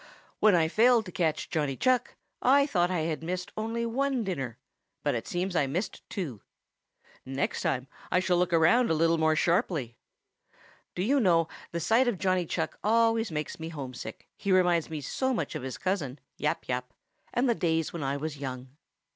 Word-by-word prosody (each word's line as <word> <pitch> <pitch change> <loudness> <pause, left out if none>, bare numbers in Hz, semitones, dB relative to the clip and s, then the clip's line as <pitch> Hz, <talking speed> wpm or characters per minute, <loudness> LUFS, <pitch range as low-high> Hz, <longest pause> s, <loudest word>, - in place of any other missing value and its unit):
"When 215 -3 +6
I 165 -2 +3
failed 230 +5 +4
to 180 - -8
catch 160 -4 -1
Johnny 145 -5 -1
Chuck, 255 -1 +1 0.3
I 280 +2 +5
thought 180 -10 +1
I 180 -3 0
had 160 -1 -2
missed 180 +2 -4
only 225 +2 -2
one 260 +1 0
dinner, 135 - -3 0.5
but - - +1
it - - -3
seems 180 +1 -2
I 145 -4 +2
missed 180 +10 -3
two. 140 - -4 0.8
Next 135 +1 -2
time 130 +1 -1 0.2
I 180 - +4
shall 185 -1 +2
look 180 0 +1
around 170 +10 +4
a 160 - +2
little 165 +1 +3
more 160 0 +3
sharply. 165 - 0 1.0
Do 180 - -1
you 275 +7 +3
know, 170 -7 +4 0.2
the 170 - -2
sight 225 +9 +3
of 235 -5 +1
Johnny 185 -2 +1
Chuck - - -3
always 225 +1 +3
makes 150 +1 -4
me 160 0 -5
homesick, 135 -6 -7
he 200 - -2
reminds 175 -3 +3
me 155 -2 -4
so 260 - -1
much - - -2
of - - -4
his 130 0 -5
cousin, 155 -9 -2 0.2
Yap - - -2
Yap, 125 -1 -3 0.4
and 245 +2 +1
the 240 - +4
days 165 -6 0
when 170 - -4
I 140 0 -1
was 150 0 -5
young." 130 -1 -6
175 Hz, 190 wpm, -29 LUFS, 150-215 Hz, 1.0 s, When